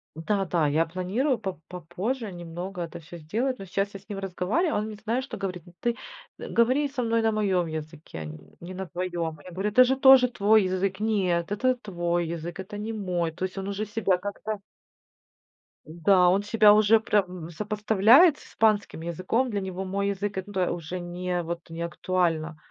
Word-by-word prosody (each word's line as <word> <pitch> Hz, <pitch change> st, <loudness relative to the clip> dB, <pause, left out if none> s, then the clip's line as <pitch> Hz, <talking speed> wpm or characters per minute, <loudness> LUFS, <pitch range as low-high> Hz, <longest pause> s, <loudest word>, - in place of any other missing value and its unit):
Да-да, 175 Hz, -2 st, 0 dB
я 160 Hz, +3 st, +2 dB
планирую 190 Hz, -, -1 dB
по 190 Hz, -7 st, -5 dB
попозже 185 Hz, -, -4 dB
немного 175 Hz, +2 st, -6 dB
это 170 Hz, 0 st, -7 dB
всё 170 Hz, +2 st, -11 dB
сделать, 230 Hz, -, -2 dB
но 195 Hz, -, -7 dB
сейчас 195 Hz, +2 st, -2 dB
я 195 Hz, -, -7 dB
с 200 Hz, -, -28 dB
ним 200 Hz, -, -4 dB
разговариваю, 195 Hz, -, -1 dB
он 210 Hz, -, -2 dB
мне 215 Hz, -, -7 dB
знаешь, 230 Hz, +5 st, -2 dB
что 270 Hz, -, -7 dB
говорит. 185 Hz, -3 st, -4 dB
"Ну 175 Hz, -, -16 dB
ты 235 Hz, 0 st, 0 dB, 0.4 s
говори 255 Hz, +5 st, +2 dB
со 265 Hz, -2 st, -3 dB
мной 230 Hz, 0 st, +1 dB
на 220 Hz, 0 st, +2 dB
моем 190 Hz, -5 st, +1 dB
языке, 155 Hz, -, -7 dB
нь 75 Hz, 0 st, -8 dB, 0.2 s
не 180 Hz, +2 st, -8 dB
на 190 Hz, 0 st, -5 dB
твоем". 175 Hz, -2 st, -3 dB
Я 185 Hz, -, -11 dB
говорю: 195 Hz, +4 st, -2 dB
"Это 255 Hz, +4 st, +7 dB
же 265 Hz, +2 st, +1 dB
тоже 265 Hz, -2 st, +7 dB
твой 215 Hz, -2 st, +3 dB
язык". 185 Hz, +1 st, -1 dB
Он -, -, -1 dB
сказал: -, -, 0 dB
"Нет, 175 Hz, -3 st, 0 dB
это 255 Hz, +5 st, +2 dB
твой 175 Hz, -6 st, -2 dB
язык, 170 Hz, +2 st, -5 dB
это 190 Hz, +2 st, -8 dB
не 215 Hz, +2 st, -4 dB
мой". 180 Hz, -6 st, -1 dB
То 185 Hz, -, -5 dB
есть, 190 Hz, -, -11 dB
он 195 Hz, 0 st, -4 dB
уже 205 Hz, +2 st, -3 dB
себя 195 Hz, -4 st, +1 dB
как-то 205 Hz, +2 st, -5 dB, 1.3 s
Н-да, 175 Hz, +3 st, +3 dB
он 195 Hz, +3 st, +3 dB
себя 210 Hz, 0 st, +6 dB
уже 215 Hz, +1 st, +5 dB
прям 180 Hz, -6 st, -1 dB
сопоставляет 215 Hz, -, +4 dB
с -, -, -15 dB
испанским 215 Hz, -6 st, +1 dB
языком. 185 Hz, +10 st, -1 dB
Для 205 Hz, -1 st, -1 dB
него 190 Hz, 0 st, -4 dB
мой 200 Hz, +1 st, -1 dB
язык- 200 Hz, 0 st, -2 dB
это 190 Hz, -1 st, -1 dB
уже 175 Hz, +1 st, -5 dB
не 175 Hz, 0 st, -3 dB
вот 170 Hz, 0 st, -6 dB
не 165 Hz, +1 st, -5 dB
актуально 170 Hz, -2 st, -1 dB
190 Hz, 195 wpm, -26 LUFS, 175-215 Hz, 1.3 s, Это